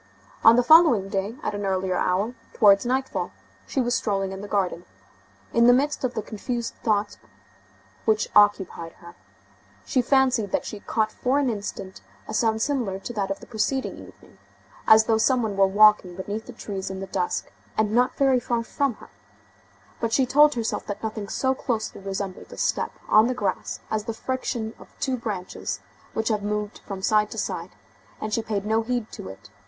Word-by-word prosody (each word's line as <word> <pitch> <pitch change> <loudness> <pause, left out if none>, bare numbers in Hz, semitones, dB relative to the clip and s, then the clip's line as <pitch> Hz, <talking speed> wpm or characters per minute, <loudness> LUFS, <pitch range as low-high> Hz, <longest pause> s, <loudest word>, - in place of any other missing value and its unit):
On 225 +1 +8
the 245 - +4
following 250 - +6
day, 200 +2 -2
at - - -2
an 205 0 -4
earlier 190 -1 0
hour, 190 +7 0 0.2
towards 205 0 +5
nightfall, 260 +1 -1 0.4
she - - -2
was 245 -1 +1
strolling 195 -4 0
in 190 0 -6
the 205 - -7
garden. 190 -4 -1 0.7
In 235 0 +5
the 245 - +8
midst 285 +4 +1
of 255 -1 -1
the 220 - -2
confused 235 +3 -4
thoughts 210 -2 0 0.9
which 215 -1 +2
occupied 195 -5 +3
her, 170 0 -14 0.7
she 255 - +2
fancied 255 -5 +2
that - - 0
she 210 - -6
caught 215 +1 -1
for 255 +5 0
an 275 -4 +2
instant 200 -3 -6 0.3
a - - -6
sound 220 0 +1
similar 245 -10 -1
to 195 +5 -7
that 200 -3 -2
of 195 - -4
the - - -10
preceding 255 +4 -1
evening, - - -15 0.5
as 220 0 +8
though 220 0 +2
some 245 +2 +3
one 210 -2 -2
were 195 0 +5
walking 205 -2 +5
beneath 205 +4 -5
the - - -7
trees 195 -4 -5
in 190 0 -5
the 195 - -4
dusk, 180 -2 -2 0.3
and 220 -1 +2
not 245 +3 +2
very 270 -2 +4
far 235 -1 -1
from 275 +1 -1
her; - - -15 0.9
but 230 -1 -1
she 265 +2 +3
told 295 +3 +5
herself 230 -2 -2
that 205 +1 -5
nothing 215 -2 -4
so 265 0 +1
closely 225 -6 -3
resembles 195 -1 -5
a - - -10
step - - 0
on 215 +2 +6
the 255 - -1
grass 250 - -2
as 215 -1 -1
the 225 - -4
friction 240 -3 -3
of - - -15
two 265 -2 0
branches 205 -7 -4 0.4
which 220 +1 0
have 215 -2 0
moved 210 0 -3
from 195 -2 -6
side 210 0 +3
to - - -8
side, - - -4 0.4
and 215 0 -4
she 230 - +1
paid 210 -2 -3
no 220 +1 +2
heed 240 -1 -3
to - - -8
it. 100 +2 -13
220 Hz, 190 wpm, -25 LUFS, 200-245 Hz, 0.9 s, On